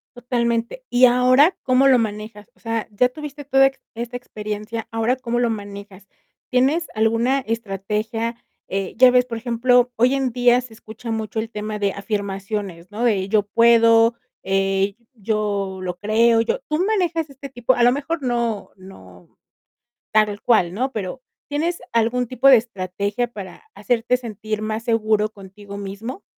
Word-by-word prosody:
Totalmente, 240 Hz, -, -2 dB
y 245 Hz, +1 st, +6 dB
ahora, 255 Hz, +7 st, +5 dB
¿cómo 255 Hz, +1 st, +4 dB
lo 260 Hz, -2 st, +5 dB
manejas? 210 Hz, -1 st, -5 dB
O -, -, -30 dB
sea, 225 Hz, -1 st, -3 dB
ya 250 Hz, +5 st, +2 dB
tuviste 290 Hz, +1 st, -8 dB
toda 270 Hz, 0 st, +5 dB
ex 270 Hz, -, -6 dB
esta 240 Hz, +2 st, -5 dB
experiencia, 215 Hz, -1 st, -6 dB
¿ahora 225 Hz, +2 st, +1 dB
cómo 240 Hz, -2 st, -2 dB
lo 240 Hz, -, +2 dB
manejas? 200 Hz, -2 st, -8 dB, 0.4 s
¿Tienes 275 Hz, +7 st, +2 dB
alguna 230 Hz, +5 st, +2 dB
estrategia? 225 Hz, +1 st, -3 dB, 0.2 s
Eh, 195 Hz, 0 st, -3 dB
ya 255 Hz, 0 st, +7 dB
ves, 250 Hz, 0 st, +4 dB
por 235 Hz, -2 st, -5 dB
ejemplo, 245 Hz, +1 st, +2 dB
hoy 245 Hz, +4 st, +3 dB
en 270 Hz, -1 st, 0 dB
día 245 Hz, 0 st, +3 dB
se 245 Hz, -2 st, -12 dB
escucha 220 Hz, +1 st, -9 dB
mucho 220 Hz, -1 st, -3 dB
el 225 Hz, +1 st, -4 dB
tema 215 Hz, 0 st, -4 dB
de 200 Hz, -1 st, 0 dB
afirmaciones, 200 Hz, -3 st, -4 dB
¿no? 215 Hz, +3 st, -4 dB
De 200 Hz, -6 st, +1 dB
yo 210 Hz, 0 st, +3 dB
puedo, 230 Hz, +1 st, +5 dB, 0.3 s
eh, 195 Hz, +1 st, 0 dB, 0.2 s
yo 205 Hz, -3 st, -2 dB
lo 180 Hz, -1 st, -4 dB
creo, 225 Hz, +3 st, +3 dB
yo 230 Hz, -, -1 dB
tú 305 Hz, +4 st, 0 dB
manejas 345 Hz, -7 st, 0 dB
este 275 Hz, 0 st, -10 dB
tipo 245 Hz, -1 st, +1 dB
a 245 Hz, -, +1 dB
lo 245 Hz, -, +6 dB
mejor 290 Hz, +4 st, -3 dB
no 235 Hz, -4 st, -1 dB
no 190 Hz, +1 st, -16 dB, 0.7 s
tal 210 Hz, -1 st, +2 dB
cual, 185 Hz, -7 st, +3 dB
¿no? 260 Hz, +6 st, -1 dB
Pero, 215 Hz, +2 st, -5 dB, 0.3 s
¿tienes 325 Hz, +4 st, -1 dB
algún 235 Hz, +2 st, +1 dB
tipo 255 Hz, +3 st, +2 dB
de 265 Hz, -2 st, +9 dB
estrategia, 205 Hz, +1 st, -3 dB
para 195 Hz, -4 st, -9 dB
hacerte 245 Hz, 0 st, 0 dB
sentir 215 Hz, -3 st, -5 dB
más 215 Hz, +1 st, -3 dB
seguro 215 Hz, -2 st, +1 dB
contigo 200 Hz, 0 st, -11 dB
mismo? 200 Hz, -, -7 dB
230 Hz, 160 wpm, -21 LUFS, 210-250 Hz, 0.7 s, de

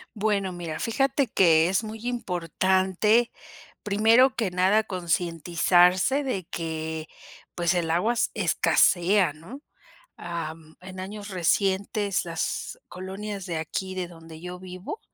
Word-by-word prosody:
Bueno, 200 Hz, -3 st, 0 dB
mira, 170 Hz, -3 st, -6 dB
fíjate 270 Hz, +3 st, +1 dB
que 165 Hz, -4 st, +4 dB
es 195 Hz, +4 st, 0 dB
muy 220 Hz, +2 st, -8 dB
importante 190 Hz, +1 st, +1 dB, 0.5 s
primero 225 Hz, +6 st, +4 dB
que 210 Hz, -6 st, -1 dB
nada 190 Hz, +4 st, +3 dB
concientizarse 175 Hz, -, +2 dB
de 200 Hz, -9 st, -2 dB
que 160 Hz, -1 st, -4 dB, 0.5 s
pues 175 Hz, 0 st, +1 dB
el 175 Hz, -2 st, -1 dB
agua 180 Hz, +8 st, +2 dB
s 240 Hz, -, +1 dB
escasea, 180 Hz, -1 st, +3 dB
¿no? 180 Hz, -, -11 dB, 0.6 s
Ah, 170 Hz, -2 st, -5 dB, 0.3 s
en 185 Hz, 0 st, -9 dB
años 205 Hz, +2 st, -7 dB
recientes 195 Hz, +2 st, 0 dB
las 165 Hz, -1 st, -3 dB
colonias 195 Hz, +2 st, -6 dB
de 170 Hz, -3 st, -3 dB
aquí 185 Hz, +4 st, -4 dB
de 185 Hz, -1 st, -3 dB
donde 165 Hz, -2 st, -12 dB
yo 180 Hz, 0 st, -7 dB
vivo 185 Hz, -, -7 dB
185 Hz, 125 wpm, -26 LUFS, 170-210 Hz, 0.6 s, que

